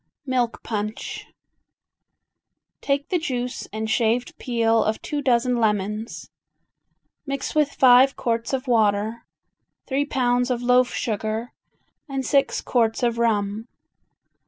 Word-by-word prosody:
Milk 250 -3 -1
Punch 215 -1 -4 1.5
Take 280 0 -1
the 360 - +1
juice 250 -6 -3
and 220 +1 -3
shaved 230 +2 0
peel 230 -2 +2
of 215 +1 -1
two 295 -1 -3
dozen 250 -2 +2
lemons, 210 0 -1 1.0
mix 275 0 -3
with 300 -2 +2
five 260 +1 +6
quarts 230 -1 -2
of 265 0 -2
water, 220 -1 +1 0.6
three 280 +1 0
pounds 245 -3 +1
of 245 -1 -1
loaf 250 0 +4
sugar 220 +1 -3 0.6
and 270 -1 -3
six 275 +2 +2
quarts 230 -1 0
of 235 -1 +1
rum. 215 -1 0
240 Hz, 115 wpm, -23 LUFS, 220-260 Hz, 1.5 s, five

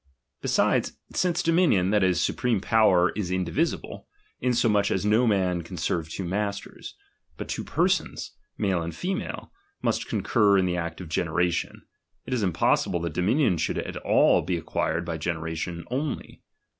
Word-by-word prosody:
Besides, - - +1 0.2
since 175 -2 +1
dominion, 160 - +3
that 105 -2 +3
is, 90 -2 +2
supreme 120 +3 +1
"power 95 -4 +4
is 100 -4 -2
indivisible, 95 - -2 0.3
insomuch 110 -5 +2
as 95 +1 -1
no 110 +4 +3
man 95 -4 +1
can 90 +2 -9
serve 80 -1 -1
two 95 - -5
masters; 100 +2 -4 0.4
but - - -6
two - - -3
persons, - - 0 0.3
male 95 -5 0
and 85 0 -5
female, 190 +2 -4 0.3
must - - 0
concur 105 -4 +3
in 95 - +3
the 90 -1 0
act 85 0 -4
of 85 - -8
generation; 85 +2 -1 0.4
it 130 - -4
is 120 -4 0
impossi 90 -5 +2
ble 85 - 0
that 85 -2 -3
dominion 100 - +2
should - - -1
at - - -4
all - - +4
be 90 -2 -1
acquired 80 0 -2
by 80 -1 -4
generation 85 +1 -3
only. 140 +4 -4
95 Hz, 155 wpm, -26 LUFS, 85-110 Hz, 0.4 s, power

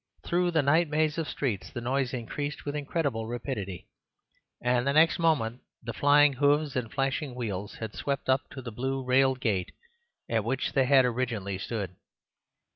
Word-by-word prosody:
Through 175 +1 +1
the 160 -4 +2
night 155 +4 +3
maze 155 +1 +1
of 160 - -2
streets 115 -9 -2
the 120 - -6
noise 130 +1 0
increased 140 +4 -4
with 145 0 -3
incredible 140 -6 -2
rapidity, 110 -6 -5 0.7
and 125 +1 +1
the 140 - +2
next 160 +3 +5
moment 135 -8 +1 0.2
the 115 0 -4
flying 145 +6 +5
hoofs 145 +2 +2
and 120 -4 -2
flashing 135 0 -1
wheels 105 -5 -4
had 110 -2 -6
swept 140 -1 -3
up 130 +1 +1
to 130 - -8
the 120 - -6
blue 135 +4 -2
railed 130 0 +3
gate 100 -7 -1 0.5
at 115 -2 0
which 130 +4 -1
they 135 - +3
had 135 -1 +6
originally 115 -6 -2
stood. 95 -4 -4
130 Hz, 170 wpm, -28 LUFS, 115-145 Hz, 0.7 s, had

